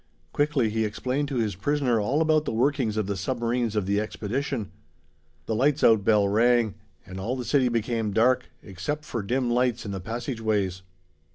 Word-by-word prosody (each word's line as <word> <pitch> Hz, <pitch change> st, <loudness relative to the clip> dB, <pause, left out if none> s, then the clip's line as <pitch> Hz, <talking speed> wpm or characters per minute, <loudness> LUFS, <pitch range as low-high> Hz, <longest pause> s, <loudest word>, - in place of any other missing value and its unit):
Quickly 145 Hz, -6 st, +1 dB
he 110 Hz, +1 st, 0 dB
explained 130 Hz, +6 st, -2 dB
to 140 Hz, -, -4 dB
his 110 Hz, -4 st, 0 dB
prisoner 130 Hz, +2 st, +1 dB
all 140 Hz, +10 st, +1 dB
about 155 Hz, -1 st, +2 dB
the -, -, -2 dB
workings 120 Hz, -2 st, +1 dB
of 110 Hz, -, 0 dB
the 100 Hz, +1 st, -2 dB
submarines 120 Hz, +2 st, -1 dB
of 105 Hz, -3 st, 0 dB
the 100 Hz, +2 st, +1 dB
expedition. 110 Hz, 0 st, -3 dB, 0.7 s
The -, -, -2 dB
lights 140 Hz, +6 st, +2 dB
out 110 Hz, -3 st, +5 dB
bell 105 Hz, -1 st, +4 dB
rang, 115 Hz, +1 st, +3 dB, 0.3 s
and 95 Hz, -1 st, -8 dB
all 115 Hz, +7 st, -2 dB
the 125 Hz, -2 st, -5 dB
city 130 Hz, +1 st, +2 dB
became 115 Hz, -1 st, -1 dB
dark, 120 Hz, +5 st, +2 dB
except 145 Hz, +11 st, -5 dB
for 115 Hz, -, -3 dB
dim 120 Hz, +4 st, -1 dB
lights 120 Hz, -1 st, +1 dB
in 100 Hz, -, -4 dB
the 95 Hz, -, -4 dB
passageways. 110 Hz, -4 st, -2 dB
115 Hz, 180 wpm, -26 LUFS, 105-130 Hz, 0.7 s, out